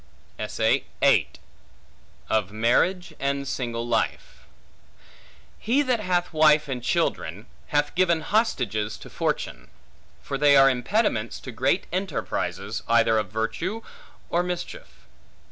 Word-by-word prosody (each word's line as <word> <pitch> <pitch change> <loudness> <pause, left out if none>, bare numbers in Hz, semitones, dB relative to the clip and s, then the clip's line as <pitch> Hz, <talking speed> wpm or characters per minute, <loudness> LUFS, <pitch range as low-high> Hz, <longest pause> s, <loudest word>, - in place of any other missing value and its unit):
Of 105 -3 0
Marriage 125 - +1
And 140 0 -1
Single 120 -3 -3
Life 115 -2 -2 1.1
HE 260 +7 +2
THAT 250 -4 +1
hath 180 -4 -1
wife 155 -1 +5
and 130 -3 -4
children 100 -4 -1 0.2
hath 145 0 0
given 175 -3 +2
hostages 120 - 0
to - - -12
fortune; - - -3 0.5
for 135 - -4
they 145 -1 +6
are 135 0 +7
impediments 125 - 0
to 130 - -7
great 130 - +1
enterprises, 185 -3 -3
either 115 -1 +4
of 105 -3 -3
virtue 165 - -3 0.5
or 170 - +2
mischief. 180 - -6
140 Hz, 110 wpm, -25 LUFS, 115-180 Hz, 1.1 s, are